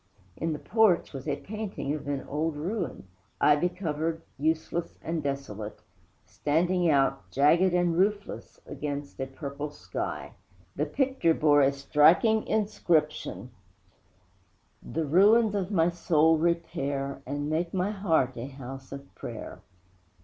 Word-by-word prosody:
In 165 - -2
the 150 - -2
porch 215 -3 +2
was 135 +1 -7
a 145 - +1
painting 205 -6 -4
of 150 -2 -6
an 140 -1 -3
old 155 +2 -1
ruin 170 - -4 0.3
ivy 150 +4 +4
covered, 165 -2 -3
useless 160 +3 -1
and 165 0 -2
desolate 135 -7 -5 0.5
standing 175 +4 +1
out, 135 -2 +2
jagged 170 +6 +4
and 175 -1 +2
roofless, 205 +3 -1
against 145 -1 -5
a 135 - -2
purple 140 +2 -6
sky. 90 -11 -5 0.4
The 150 +2 -1
picture 255 - +1
bore 145 -1 +4
a 135 0 +4
striking 155 +10 +4
inscription: 175 -7 0 1.3
The 165 -1 -3
ruins 205 +8 +5
of 195 -3 -1
my 170 -5 +3
soul 160 -2 +3
repair 145 -5 -1
And 145 +2 -3
make 165 +3 -1
my 190 +2 0
heart 165 -11 +1
a 120 +3 -5
house 135 -1 -9
of 140 0 -9
prayer. - - -8
155 Hz, 130 wpm, -28 LUFS, 140-180 Hz, 1.3 s, ruins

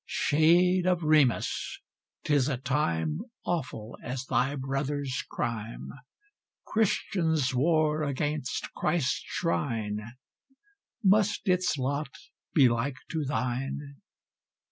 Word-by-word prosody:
Shade 175 +4 +3
of 180 -2 +2
Remus! 150 -5 +2 0.4
'tis 145 -2 +2
a 135 - -1
time 130 - 0 0.3
Awful 130 -10 -3
as 130 +1 -4
thy 135 +3 +1
brother's 135 0 -2
crime! 115 -1 -4 0.7
Christians 165 - +1
war 155 +3 +2
against 145 -1 -2
Christ's 135 -7 0
shrine: 115 - -1 1.0
Must 205 +1 +3
its 180 -3 +2
lot 140 +3 -1 0.5
be 140 -5 +7
like 120 +4 0
to 160 -3 -1
thine? 135 +2 -3
145 Hz, 95 wpm, -28 LUFS, 130-160 Hz, 1.0 s, be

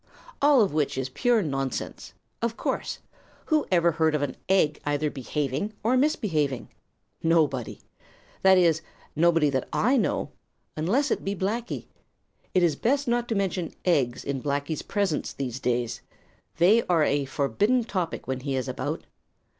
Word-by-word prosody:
All 280 -4 +6
of 195 - -1
which 150 -3 0
is 130 0 -2
pure 235 - +2
nonsense. 135 -4 -4 0.3
Of 235 0 -1
course. - - -2 0.5
Who 310 -2 +1
ever 170 -1 +4
heard 160 -1 +2
of 145 - 0
an 135 -3 -3
egg 155 -6 +3
either 145 +1 0
behaving 145 - -2
or 235 +4 +3
misbehaving? 160 - 0 0.5
Nobody. 155 -7 +1 0.6
That 190 0 +6
is, 165 -3 +4 0.3
nobody 165 -2 +3
that 130 -2 -2
I 255 +5 +2
know, - - 0 0.4
unless 230 - +1
it - - 0
be 195 +1 -2
Blacky. 220 +6 -3 0.7
It 185 - +4
is 165 -4 +3
best 275 - +1
not 240 0 +1
to 225 - -1
mention 185 -4 -2
eggs 140 -9 +1
in 140 -2 -3
Blacky's 145 +2 -2
presence 195 -7 -1
these 130 -2 -4
days. 120 -2 -1 0.6
They 195 +8 +5
are 170 -3 +3
a 145 -1 +1
forbidden 145 - +1
topic 185 -7 -3
when 130 -1 -2
he 135 +1 -3
is 130 -2 -2
about. - - -4
165 Hz, 155 wpm, -26 LUFS, 140-205 Hz, 0.7 s, All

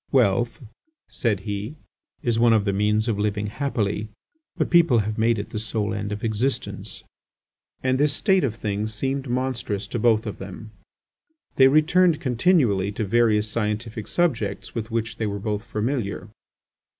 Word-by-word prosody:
"Wealth," 120 +2 +2 0.5
said 105 -5 -1
he, 105 +6 -4 0.5
"is 115 -2 +1
one 115 -1 +5
of 105 -2 +2
the 100 - +1
means 105 +3 +1
of 110 -3 0
living 105 0 0
happily; 110 -3 -2 0.5
but - - -1
people 170 -8 +5
have 110 0 -1
made 115 +1 +3
it 100 - -5
the 110 - -3
sole 110 -1 -2
end 105 -1 -3
of 105 0 -5
existence." 115 +4 -2 0.8
And 130 0 +1
this 145 0 +3
state 190 +5 +2
of 115 -5 -1
things 105 0 -3
seemed 135 +3 -2
monstrous 120 -5 -2
to 120 - -2
both 110 -1 +3
of 105 - -5
them. 100 +3 -9 0.9
They 130 - +8
returned 155 +3 +4
continually 125 - +2
to 110 - -2
various 110 0 +3
scientific 110 0 -3
subjects 170 -9 -1
with 110 -1 -4
which 115 -1 -2
they 110 - -1
were 100 0 -3
both 105 +1 -3
familiar. 110 -2 -3
110 Hz, 160 wpm, -24 LUFS, 105-130 Hz, 0.9 s, They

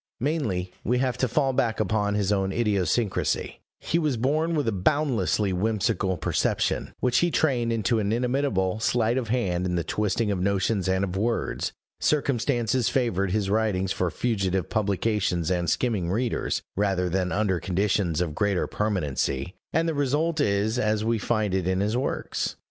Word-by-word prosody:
Mainly, 110 - -1
we 125 +4 +1
have 130 -1 0
to 130 - +2
fall 135 +2 +1
back 115 -3 0
upon 105 -1 +1
his 105 -1 +1
own 95 -1 +1
idiosyncrasy: 105 0 0 0.2
he 170 - 0
was 150 -6 0
born 155 +7 +1
with 145 -5 0
a - - +2
boundlessly 105 - +1
whimsical 100 -1 0
perception, 80 - -1
which 125 -1 +3
he 175 - +2
trained 125 -8 +1
into 115 0 +1
an 105 -1 0
inimitable 120 -5 0
sleight 115 0 +1
of 120 - -4
hand 95 -7 0
in 90 - -1
the 85 - 0
twisting 105 +3 0
of 95 -3 -1
notions 100 +1 +1
and 95 +1 +1
of 95 -2 -3
words; 115 +4 -1 0.3
circumstances 125 -4 +1
favored 100 -7 0
his 100 +1 0
writing 105 -3 +1
for 90 -1 0
fugitive 95 -4 -1
publications 100 -4 0
and 85 -2 0
skimming 105 -9 0
readers, 115 +5 -1
rather 95 -2 +1
than 90 +1 -1
under 95 -3 +1
conditions 90 -1 0
of 85 -4 -1
greater 100 +1 +1
permanency; 75 -7 -1 0.2
and 165 +2 +1
the 165 - 0
result 150 +3 0
is 105 +1 +1
as 110 -2 +1
we 115 0 +1
find 105 -2 0
it 95 -2 0
in 95 0 +1
his 105 +3 0
works. 130 +3 -2
105 Hz, 165 wpm, -26 LUFS, 95-120 Hz, 0.3 s, which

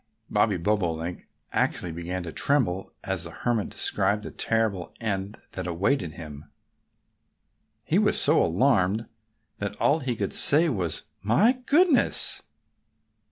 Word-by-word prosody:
Bobby 105 -1 +2
Bobolink 85 -3 -2 0.2
actually 90 - -1
began 85 +2 -5
to 85 - -6
tremble 105 - +1
as 95 -3 -2
the 85 - -7
Hermit 115 +4 -2
described 105 +1 0
the - - -7
terrible 110 -6 -1
end 100 -2 -3
that 95 -1 -5
awaited 90 - -1
him. 75 -3 -10 1.4
He - - +2
was - - +4
so - - +5
alarmed 105 +2 +2 0.5
that 100 0 -4
all 145 +8 +2
he 130 -4 -3
could 100 -3 -3
say 160 +4 +5
was, 90 - -3 0.2
"My 120 - +4 0.2
goodness!" 320 -1 +3
100 Hz, 125 wpm, -26 LUFS, 90-115 Hz, 1.4 s, so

